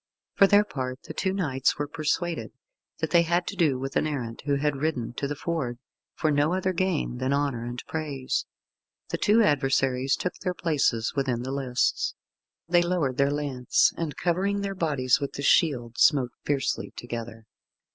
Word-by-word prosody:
For 195 - +6
their 205 +1 +6
part 130 -9 -5
the - - -8
two 190 - 0
knights 145 -9 0
were 145 0 -2
persuaded 160 +3 -2 0.5
that - - -1
they 170 - +6
had 175 +1 +1
to 200 - -5
do 155 -8 +2
with 135 +1 -5
an - - +2
errant 125 -6 -4
who 140 - +3
had 145 0 0
ridden 130 -7 -1
to 140 - -3
the 145 - -3
ford 145 -7 -3 0.4
for 155 - +1
no 145 +4 +2
other 185 0 0
gain 175 -9 -1
than 130 +1 0
honour 140 -4 0
and 120 +1 -5
praise. 145 -5 -3 0.6
The - - -2
two 220 +2 +4
adversaries 135 -4 +2
took 180 - -3
their 180 -1 -2
places 140 -9 +1
within 130 -4 0
the 130 - -4
lists. 130 -3 0 0.5
They 175 0 +4
lowered 170 -8 0
their 140 0 +3
lance, 140 -4 +1
and 160 -3 -4
covering 195 +3 0
their 200 0 -2
bodies 140 -8 +1
with 140 -1 -4
the 140 - -5
shield, 120 -7 +2
smote 130 -5 +4
fiercely 140 -2 -1
together. 115 -2 -7
145 Hz, 175 wpm, -26 LUFS, 130-170 Hz, 0.6 s, For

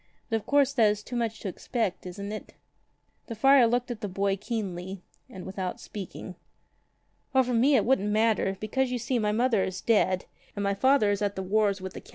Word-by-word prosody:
But 225 - +3
of 215 - -9
course 285 -1 +3
that 225 -5 +4
is 210 0 -2
too 245 - -7
much 225 -2 -2
to - - -4
expect, 195 0 -3
isn't 200 +3 -6
it?" 215 - -8 0.7
The 230 - -5
friar 270 +2 +6
looked 245 +1 0
at 230 - -6
the 205 - -2
boy 195 +1 0
keenly 195 -4 -5 0.3
and 185 -2 -9
without 190 -1 -4
speaking. 195 -2 -8 1.0
"O 260 - +6
for 250 0 -2
me 260 +5 +4
it 225 - +3
wouldn't 225 -5 +2
matter, 215 -2 +1
because, 260 +5 -1
you 250 - -1
see, 240 +1 -1
my 210 -1 +1
mother 230 -2 +2
is 185 0 -4
dead, 190 -5 +2 0.3
and 205 - -3
my 200 0 +1
father 215 +1 +3
is 200 - -1
at 205 -1 -1
the 190 - -3
wars 200 0 +1
with 190 0 -6
the - - -8
Count. - - -19
215 Hz, 215 wpm, -27 LUFS, 195-240 Hz, 1.0 s, friar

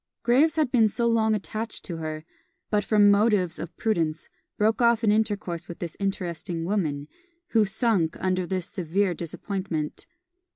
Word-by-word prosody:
Graves 265 +7 +4
had 305 -5 +1
been 225 -4 +4
long 230 -2 +2
attached 215 +2 -5
to 170 - -5
her, 155 -1 -5 0.5
but 210 -1 +2
from 205 -2 +5
motives 200 -4 +2
of 170 0 -7
prudence 165 -8 -1 0.3
broke 220 +3 +2
off 235 -1 +4
an 215 - +4
intercourse 205 -6 -1
with 170 - -8
this 170 -2 -6
interesting 175 -3 -3
woman, 155 -7 -1 0.4
who 220 -2 +3
sunk 195 -5 +1
under 185 -1 0
this 185 -2 -2
severe 190 -1 -1
disappointment. 170 -1 -4
195 Hz, 150 wpm, -26 LUFS, 170-220 Hz, 0.5 s, from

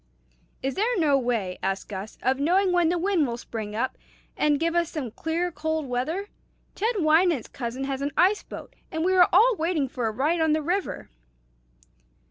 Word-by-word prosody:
"Is 270 0 -1
there 460 +5 0
no 305 -5 +3
way," 235 -8 -1
asked 195 0 -2
Gus, 200 +1 -7
"of 260 +2 +1
knowing 365 +6 +3
when 350 -2 +3
the 350 - +1
wind 350 -4 +1
will 235 -1 -3
spring 215 -3 -6
up, 255 +4 -2 0.4
and 295 -1 +2
give 335 +1 0
us 340 -1 +2
some 275 -8 -5
clear 335 +7 -2
cold 315 -1 -2
weather? 310 +11 -2 0.4
Ted 450 +4 -1
Wynant's 320 - +3
cousin 245 +1 -5
has 270 0 -3
an 285 - 0
ice 390 +4 +4
boat, - - -10 0.2
and 320 -1 -1
we 375 - +3
are 360 -2 +6
all 485 +2 +5
waiting 315 -3 0
for 245 -2 -3
a - - -1
ride 300 +9 0
on 320 -1 +3
the 310 0 0
river." 360 - -2
315 Hz, 190 wpm, -25 LUFS, 255-355 Hz, 0.4 s, are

